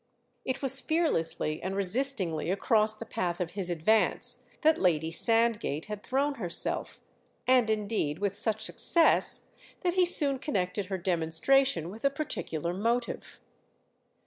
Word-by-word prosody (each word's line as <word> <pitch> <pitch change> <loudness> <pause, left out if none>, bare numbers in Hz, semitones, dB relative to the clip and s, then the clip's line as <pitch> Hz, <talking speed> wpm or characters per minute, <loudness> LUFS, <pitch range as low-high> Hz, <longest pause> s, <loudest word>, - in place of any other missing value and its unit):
It 260 +2 -3
was 270 0 +2
fearlessly 210 - -1
and 190 +2 -4
resistingly 195 - 0
across 215 +2 +1
the 230 - -9
path 175 -5 -3
of 175 -2 -3
his 190 -2 -4
advance 175 +6 +1 0.2
that 315 0 +3
Lady 160 -3 +1
Sandgate 225 -5 +2
had 210 -1 -7
thrown 275 +5 -1
herself, 175 -3 -1 0.5
and 250 -3 +3
indeed 210 -8 -1
with 200 0 -2
such 220 +1 -2
success 330 +8 +3 0.4
that 355 -2 0
he 365 0 +3
soon 280 -6 +4
connected 195 -8 -2
her 190 0 -3
demonstration 175 - +1
with 220 +3 -12
a 275 - +4
particular 175 - -4
motive. 235 +5 -3
210 Hz, 135 wpm, -28 LUFS, 175-260 Hz, 0.5 s, soon